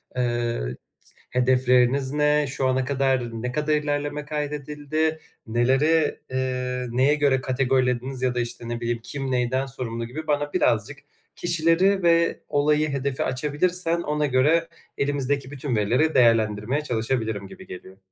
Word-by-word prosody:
Eee, 120 - 0
i 65 - -9 0.5
hedefleriniz 125 +1 +2
ne? 150 0 +2
Şu 135 0 -1
ana 130 0 +1
kadar, 135 -2 +1 0.2
ne 125 +1 -2
kadar 150 +3 0
ilerleme 145 0 -2
kaydedildi? 150 +1 -2 0.3
Neleri, 135 +7 +2
eee, 125 -1 -2
neye 130 +5 +3
göre 140 -3 +2
kategorilediniz 130 0 0
ya 125 -1 0
da, - - 0
işte, 120 0 -5
ne 120 0 -4
bileyim, 120 0 -1
kim 135 0 -4
neyden 125 +2 0
sorumlu 115 -3 -5
gibi 155 +6 -7
bana 145 0 0
birazcık - - +1 0.4
kişileri 175 +3 +2
ve 170 0 +3
olayı, 150 +1 +2
hedefi 140 -1 -2
açabilirsen 165 +5 -1
ona 150 -1 0
göre 150 +5 +3 0.3
elimizdeki 140 -1 -1
bütün 140 -3 -3
verileri 125 +10 +2
değerlendirmeye 115 +2 +3
çalışabilirim 110 -5 -2
gibi - - -13
geliyor. 95 +1 -10
135 Hz, 135 wpm, -24 LUFS, 125-150 Hz, 0.5 s, neye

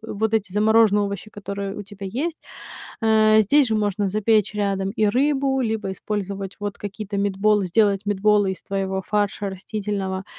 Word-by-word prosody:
вот 220 0 -2
эти 205 -4 -1
замороженные 215 0 +4
овощи, 200 +1 -4
которые 200 -1 -5
у 205 - -5
тебя 200 -1 -9
есть. 300 - -3 0.6
А, 220 -1 +5
здесь 280 +7 +4
же 220 - 0
можно 205 -1 0
запечь 215 +1 +1
рядом 195 -2 -1
и 215 0 +1
рыбу, 270 +3 +1
либо 220 -5 -2
использовать 200 -1 -5
вот 205 -1 -4
какие-то 205 0 -6
meetball, 200 +1 +2
сделать 200 +1 +2
митболы 205 -1 +2
из 190 - -10
твоего 190 -1 -2
фарша 205 -1 -1
растительного 195 -1 -4
205 Hz, 155 wpm, -22 LUFS, 195-215 Hz, 0.6 s, А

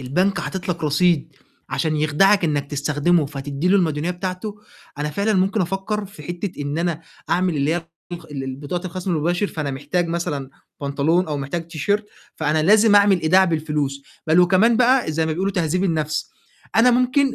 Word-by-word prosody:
البنك 180 +10 0
حاطط 190 -1 -5
لك 170 -3 -2
رصيد 155 -1 +1 0.3
عشان 155 -2 0
يخدَعك 175 +6 +3
إنّك 145 -2 -1
تستخدمه، 150 +3 +1
فتدّي 140 +3 -3
له 195 - +5
المديونية 160 -3 0
بتاعته، 185 +3 -5 0.4
أنا 150 +1 -2
فعلًا 200 +7 0
ممكن 195 +3 +1
أفكّر 195 +4 -2
في 185 -6 -13
حتّة 175 +2 -5
إن 145 +3 -3
أنا 170 -2 -1 0.3
أعمل 180 -2 +1
اللي 145 +3 +1
هي - - +1 0.4
الطخ 170 -1 -7
ال 135 -2 -5
ال 130 -1 -5
بطاقة 170 +6 -4
الخَصم 185 +1 -4
الُمباشر، 175 +4 0
فأنا 155 -6 -4
محتاج 145 +6 -2
مثلًا 145 -5 -3 0.3
بنطلون 145 +5 +1
أو 150 -2 -3
محتاج 160 +4 -4
تيشيرت، 200 +6 -1 0.3
فأنا 155 0 +1
لازم 210 +4 +5
أعمل 200 -3 +5
إيداع 180 +4 +5
بالفلوس 150 -5 -2 0.2
بَل 160 +3 +5
وكمان 190 +6 +4
بقى 250 -6 +3
زي 160 +1 0
ما 160 - -1
بيقولوا 190 +4 -1
تهذيب 180 +1 0
النَفْس، 155 -3 -1 0.5
أنا 235 +3 +6
ممكن 255 +3 +2
170 Hz, 175 wpm, -21 LUFS, 150-190 Hz, 0.5 s, أنا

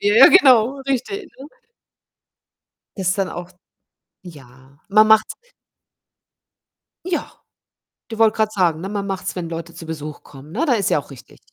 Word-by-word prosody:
Ja, 205 +1 +1
ja, 255 - +10
genau. 265 - +4
Richtig, 330 - -3
ne? 270 - -10 1.5
Das 185 -1 0
dann 195 -2 -2
auch 175 +1 -8 0.7
ja, 135 -4 -16
man 215 +1 +5
macht's 220 0 +4 1.7
Ja, 360 -2 -3 0.8
du 225 - -7
wollte 220 -1 +4
grade 215 -1 +1
sagen, 170 -5 0
ne? 190 - -5
Man 200 -1 -4
macht's, 190 -1 -4
wenn 170 -2 -5
Leute 165 0 -7
zu 165 -1 -11
Besuch 155 -2 -8
kommen, 140 +3 -15
ne? 280 - -1
Da 270 - +2
ist 200 -5 0
ja - - +2
auch 145 - -13
richtig, 130 - -15
195 Hz, 155 wpm, -20 LUFS, 165-225 Hz, 1.7 s, ja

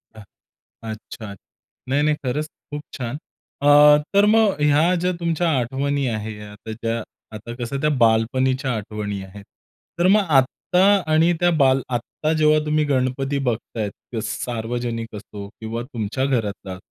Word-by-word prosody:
हां. 110 - -11 0.7
अच्छात. 110 -1 -9 0.5
नाही, 140 +2 +2
नाही 150 0 +2
खरंच 145 +4 -2 0.2
खूप 145 0 -4
छान! 125 +1 -4 0.4
अ, 145 - +4 0.4
तर 200 +1 +5
मग 210 -7 +3
ह्या 150 +4 +4
ज्या 180 - +2
तुमच्या 170 0 0
आठवणी 140 +3 -1
आहे 105 0 -6
आता 105 +2 -10
ज्या 115 +1 -2 0.4
आता 115 +3 -7
कसं 125 +3 -3
त्या 150 - +2 0.2
बालपणीच्या 130 +4 +1
आठवणी 105 -1 -4
आहेत. 100 +1 -11 0.6
तर 175 - +4
मग 210 +3 +5 0.2
आत्ता 180 +7 0 0.3
आणि 160 +2 +4
त्या 175 - +4
बाल 135 0 +4
आत्ता 130 +6 -2
जेव्हा 155 0 +4
तुम्ही 150 0 +2
गणपती 135 0 0
बघतायेत, 110 -3 -2 0.2
त्या 115 -3 -3
स 115 +1 -4
सार्वजनिक 115 -1 -4
असो 100 -1 -8
किंवा 115 +1 -4
तुमच्या 120 0 -3
घरातला, 105 -7 -2
130 Hz, 145 wpm, -22 LUFS, 110-150 Hz, 0.7 s, तर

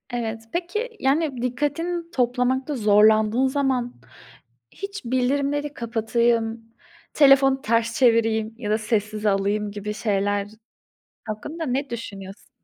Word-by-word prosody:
Evet, 225 -2 -4
peki, 390 +8 -2
yani 275 -1 0
dikkatini 310 +7 -2
toplamakta 255 +2 0
zorlandığın 215 +2 +4
zaman, 260 -3 0 0.8
hiç 395 -6 -7
bildirimleri 280 +4 0
kapatayım, 230 -1 0 0.5
telefonu 275 -2 +5
ters 230 0 0
çevireyim 225 -3 +3
ya 210 -4 -4
da 215 - +3
sessize 215 -1 -1
alayım 205 +1 0
gibi 205 +1 -5
şeyler 205 -2 -1 0.8
hakkında 295 +10 -5
ne 270 +1 -2
düşünüyorsun? 195 -4 -8
240 Hz, 105 wpm, -23 LUFS, 215-275 Hz, 0.8 s, telefonu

